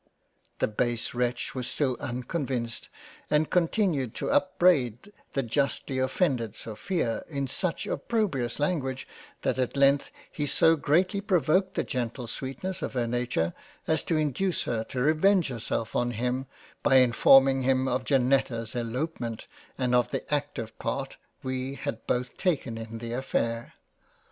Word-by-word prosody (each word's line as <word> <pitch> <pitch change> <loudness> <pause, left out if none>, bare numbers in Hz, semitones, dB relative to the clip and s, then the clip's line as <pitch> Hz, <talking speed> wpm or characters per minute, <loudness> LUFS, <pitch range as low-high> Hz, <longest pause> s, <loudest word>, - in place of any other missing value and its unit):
" - - -43
The - - +4
base 120 +2 -1
wretch 125 0 -1
was 125 -2 -3
still 135 -4 0
unconvinced 125 -2 -3 0.4
and 150 +1 +2
continued 170 - +1
to - - -2
upbraid 175 - +2 0.2
the 135 - 0
justly 135 +2 -1
offended 130 - 0
Sophia 115 - -2
in 140 -3 -2
such 170 +6 -2
opprobious 180 - -1
Language, 135 -4 -1 0.4
that - - 0
at 130 +2 -1
length 140 0 +4 0.2
he 145 - -2
so 160 +3 +5
greatly 180 +7 +2
provoked 185 -1 +2
the - - +1
gentle 120 -1 -3
sweetness 140 +10 -5
of - - -3
her 125 -2 0
Nature, 115 -8 -1 0.3
as 160 - +1
to 165 - +1
induce 155 +5 0
her 115 -2 -1
to 130 - -5
revenge 160 +4 +4
herself 115 -2 -3
on 120 0 +2
him 125 +3 -2 0.3
by 135 - +4
informing 135 +2 +6
him 130 0 +2
of 130 0 0
Janetta's 125 -4 +1
Elopement, 120 -1 -3 0.3
and 125 -2 0
of 125 -1 +3
the - - -2
active 145 -6 -2
Part - - -3 0.3
we 130 +1 -3
had 115 - -5
both 125 0 -1
taken 145 -10 0
in 115 0 -6
the 115 +1 -5
affair. 115 -2 -2
130 Hz, 145 wpm, -28 LUFS, 120-155 Hz, 0.4 s, informing